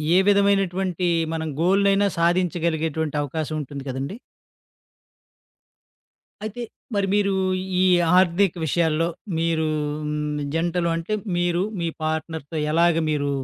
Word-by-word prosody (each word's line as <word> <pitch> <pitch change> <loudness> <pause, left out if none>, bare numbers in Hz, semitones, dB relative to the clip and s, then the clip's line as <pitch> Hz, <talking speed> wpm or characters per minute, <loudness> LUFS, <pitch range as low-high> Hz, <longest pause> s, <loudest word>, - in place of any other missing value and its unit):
ఏ - - +7
విధమైనటువంటి 195 -3 +2 0.3
మనం 160 0 -3
గోల్‌‌నైనా 200 +2 +3
సాధించగలిగేటువంటి 165 -3 0
అవకాశముంటుంది 145 -1 -4
కదండీ. 135 - -4 2.3
అయితే, 215 +3 -5 0.3
మరి 200 -1 +1
మీరు 200 -1 +2 0.5
ఈ 185 - +4 0.3
ఆర్థిక 185 0 +3
విషయాల్లో, 165 +1 +1 0.3
మీరు 165 -1 +1 0.4
హ్మ్, 150 0 -2
జంటలు 170 +1 0
అంటే 165 +6 -2 0.2
మీరు 175 0 +1 0.2
మీ 170 - 0 0.2
పార్ట్‌నర్‌తో 160 -1 -3 0.2
ఎలాగ 170 +1 +4 0.2
మీరు 145 -2 0
170 Hz, 100 wpm, -23 LUFS, 155-185 Hz, 2.3 s, ఏ